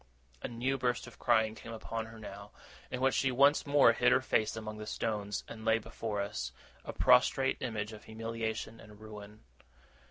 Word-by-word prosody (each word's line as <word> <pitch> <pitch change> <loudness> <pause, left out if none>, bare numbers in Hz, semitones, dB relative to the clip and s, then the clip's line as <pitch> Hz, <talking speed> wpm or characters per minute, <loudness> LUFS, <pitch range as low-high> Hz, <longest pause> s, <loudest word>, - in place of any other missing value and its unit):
A - - -3
new 130 +3 -1
burst 125 -1 0
of - - -13
crying 110 -3 +3
came 115 +1 -9
upon 115 0 -4
her 110 0 -11
now, 100 -1 -9 0.4
in 125 - -4
which 135 0 +3
she 135 - +2
once 140 +4 +4
more 145 0 +6
hid - - +3
her - - +5
face 110 0 +1
among 110 -1 -6
the 105 - -7
stones, 105 -2 -2
and 110 -1 -9
lay 110 0 +4
before 105 -1 -4
us, 65 -10 -4 0.3
a - - -5
prostrate 135 - +4
image 110 -3 -3
of 105 - -11
humiliation 115 0 -4
and 105 -1 -14
ruin. 105 -1 -11
110 Hz, 185 wpm, -32 LUFS, 105-120 Hz, 0.4 s, more